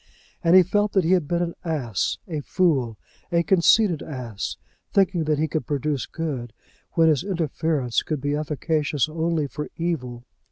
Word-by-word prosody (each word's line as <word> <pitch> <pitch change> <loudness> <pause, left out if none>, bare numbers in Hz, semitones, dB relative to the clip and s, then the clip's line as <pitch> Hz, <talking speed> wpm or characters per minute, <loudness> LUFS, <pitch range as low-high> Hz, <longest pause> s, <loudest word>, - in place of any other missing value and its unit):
And 170 +1 +5
he 185 - +9
felt 205 +3 0
that 190 - +3
he 165 - +1
had 180 -6 +3
been 175 +2 +1
an 170 -1 -3
ass, 135 - -1
a 160 -4 -3
fool, 135 - +1 0.3
a 170 0 +3
conceited 180 0 +4
ass, 120 -8 -5 0.3
thinking 185 -4 +2
that 150 -1 +1
he 155 +2 +1
could 155 0 -3
produce 145 -1 -1
good, 135 -8 -4 0.4
when 165 -1 +4
his 155 0 +3
interference 160 - 0
could 155 -3 -3
be 145 +1 -1
efficacious 150 -1 0
only 160 0 -1
for 150 +2 -6
evil. 125 -8 -3
155 Hz, 165 wpm, -24 LUFS, 140-170 Hz, 0.4 s, he